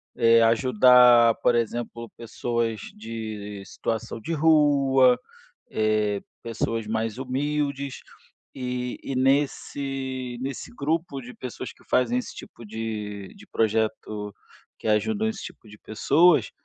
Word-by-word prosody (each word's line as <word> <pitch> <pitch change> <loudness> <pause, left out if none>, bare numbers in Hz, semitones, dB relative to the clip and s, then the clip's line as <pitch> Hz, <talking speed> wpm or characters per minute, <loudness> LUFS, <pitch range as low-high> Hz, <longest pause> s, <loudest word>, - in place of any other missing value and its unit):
eh, 115 0 +5
ajudar, 120 0 +6
por 120 - +4
exemplo, 115 0 -3
pessoas 115 -1 -2 0.2
de 105 -2 -6
situação 115 0 -4
de 165 - -5
rua, 140 -5 +4 0.5
eh, 105 -2 0 0.2
pessoas 115 -1 -3
mais 110 +1 -2
humildes, 140 +1 -2 0.6
e 125 -1 -3
e 135 - -4
nesse 135 -1 -1
nesse 135 -1 -5
grupo 155 +1 -2
de 125 +1 -10
pessoas 125 -3 -7
que - - -24
fazem 125 -1 +2
esse 125 - -4
tipo 115 - -11
de 105 -2 -5
de - - -15
projeto, 110 -1 -1 0.5
que - - -6
ajudam 215 - +1
esse 220 -2 -4
tipo 110 - -11
de 105 - -13
pessoas, 145 - +3
120 Hz, 120 wpm, -25 LUFS, 110-135 Hz, 0.6 s, ajudar